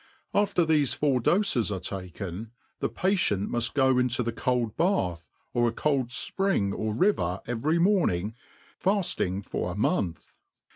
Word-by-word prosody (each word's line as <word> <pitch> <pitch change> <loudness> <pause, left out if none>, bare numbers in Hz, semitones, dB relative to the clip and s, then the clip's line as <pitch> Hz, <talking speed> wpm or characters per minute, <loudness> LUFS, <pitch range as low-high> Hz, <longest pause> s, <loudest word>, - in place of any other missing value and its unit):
After 200 -4 +2
thefe 150 -4 +2
four 140 -4 +2
doies 150 - +2
are 95 - -2
taken, 95 +3 -6 0.3
the - - -1
patient 180 - 0
muf); 120 -1 +1
go 130 -2 +3
into 125 0 +1
the 115 - -1
cold 120 -1 -1
bath, 90 - 0 0.2
or 120 0 +3
a - - +1
cold 135 0 0
fpring 125 - 0
or 110 +1 -2
riyer 110 - +1
every 120 +8 0
morning 165 - +2 0.5
faft 195 -1 +1
ing 95 +2 -3
for 90 - -3
a - - -6
month. 90 -5 -1
120 Hz, 150 wpm, -27 LUFS, 100-165 Hz, 0.5 s, go